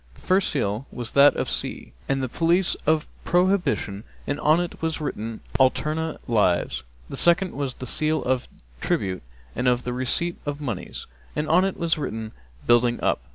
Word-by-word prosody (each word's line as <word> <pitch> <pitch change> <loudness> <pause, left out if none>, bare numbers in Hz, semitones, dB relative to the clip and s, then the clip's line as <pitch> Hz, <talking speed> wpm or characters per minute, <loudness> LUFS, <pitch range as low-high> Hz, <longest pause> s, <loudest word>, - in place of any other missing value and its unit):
The - - -18
first 190 +1 +2
seal 110 -2 -1
was 120 -2 -6
that 140 +1 +6
of - - 0
the - - -2
sea - - -4 0.2
and 135 -1 +1
the - - 0
police 170 +7 +2
of 155 -1 +3 0.2
prohibition 175 - +1 0.2
and 145 - -2
on 155 +3 +4
it 175 -1 -4
was 160 0 -1
written, 115 -7 -4 0.2
Alterna 155 +4 +1
lives. 90 - +2 0.3
The - - -6
second 175 +2 +4
was 135 -2 -3
the 130 - -7
seal 155 +5 +1
of 130 -1 0 0.3
tribute 95 -2 -1 0.3
and 125 - 0
of 125 0 +2
the 125 - -3
receipt 130 +8 0
of 145 0 -4
monies, 115 - -5 0.3
and 150 - -1
on 180 +3 +5
it 195 - -2
was 165 -2 0
written, 110 -6 -4 0.3
Building 120 0 +4
up. - - +1
140 Hz, 180 wpm, -24 LUFS, 120-160 Hz, 0.3 s, that